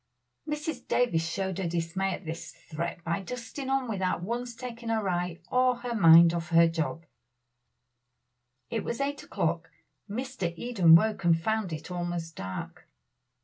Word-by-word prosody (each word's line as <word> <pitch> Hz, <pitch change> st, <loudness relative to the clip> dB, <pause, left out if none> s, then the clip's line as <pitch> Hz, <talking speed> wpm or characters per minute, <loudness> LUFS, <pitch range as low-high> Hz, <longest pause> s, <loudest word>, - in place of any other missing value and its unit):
Mrs. 300 Hz, -3 st, -4 dB
Davies 165 Hz, -10 st, +1 dB
showed 190 Hz, +1 st, -2 dB
her 185 Hz, -, -1 dB
dismay 175 Hz, +3 st, -1 dB
at 195 Hz, -, -13 dB
this 160 Hz, +1 st, -6 dB
threat 170 Hz, +1 st, -6 dB
by 170 Hz, +4 st, -1 dB
dusting 250 Hz, +6 st, -6 dB
on 270 Hz, -1 st, +1 dB
without 190 Hz, -5 st, -1 dB
once 240 Hz, +4 st, -3 dB
taking 235 Hz, -1 st, -7 dB
her 220 Hz, -3 st, 0 dB
eye 175 Hz, -1 st, -1 dB
or 255 Hz, 0 st, +3 dB
her 240 Hz, 0 st, -5 dB
mind 170 Hz, -4 st, +8 dB
off 170 Hz, -1 st, -3 dB
her 170 Hz, 0 st, +6 dB
job. 165 Hz, 0 st, -3 dB, 1.7 s
It -, -, -1 dB
was 235 Hz, -, -3 dB
eight 285 Hz, +1 st, -2 dB
o'clock. -, -, -2 dB, 0.4 s
Mr. 245 Hz, -5 st, -3 dB
Eden 185 Hz, -7 st, +5 dB
woke 215 Hz, +3 st, +2 dB
and 165 Hz, -1 st, +4 dB
found 220 Hz, +1 st, -1 dB
it 160 Hz, +3 st, -6 dB
almost 175 Hz, -2 st, -3 dB
dark. 95 Hz, 0 st, -7 dB
190 Hz, 150 wpm, -28 LUFS, 165-240 Hz, 1.7 s, mind